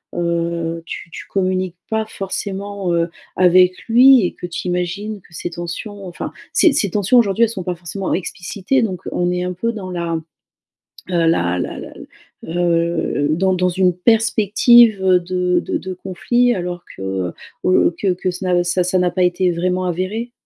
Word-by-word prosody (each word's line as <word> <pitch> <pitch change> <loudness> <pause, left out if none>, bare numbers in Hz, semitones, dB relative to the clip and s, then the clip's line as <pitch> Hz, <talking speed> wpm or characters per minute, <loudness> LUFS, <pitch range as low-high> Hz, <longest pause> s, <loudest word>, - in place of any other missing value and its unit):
heu, 170 -1 -1
tu 170 - -7
tu - - -8
communiques 185 -2 -1
pas 220 0 0
forcément, 195 -1 -4
heu, 170 0 +1 0.3
avec 180 0 +5
lui 250 -1 +7
et - - -2
que 175 - -7
tu 175 +1 -5
imagines 185 +4 -3
que 175 - -22
ces 175 +1 -5
tensions 180 +4 -6
enfin, 175 - -6 0.2
ces - - +5
ces 200 - +1
tensions, 205 +6 +2
aujourd'hui, 220 0 +2
elles 225 - +3
sont 195 -5 -5
pas 180 0 -3
forcément 175 +3 -5
explicitées, 190 +7 -1
donc 190 -6 -2
on 175 0 0
est 180 0 -1
un 180 - -2
peu 230 +6 -2
dans 195 -5 -7
la, 170 -1 -3
heu, 160 - -3 0.9
la 165 - +2
la - - -4
la - - -9
l - - -11 0.4
heu, 170 -3 0
dans 190 +4 +2
dans 180 0 +1
une 180 0 +2
perspective, 225 +1 +4
heu, 185 -1 +5
de 180 0 0
de - - -3
de 185 0 -6
conflits 240 +7 +1
alors 175 -1 -4
que, - - -8
heu, 95 -2 -2 0.3
heu, 185 -1 +3
que 200 - -1
que 185 +1 -2
ce 185 +2 -7
n'a 180 -1 +2
ça 175 +1 +1
ça 180 +1 +1
n'a 180 -1 +2
pas 185 - 0
été 180 0 +2
vraiment 180 +2 -1
avéré. 185 +7 -3
180 Hz, 185 wpm, -19 LUFS, 175-200 Hz, 0.9 s, lui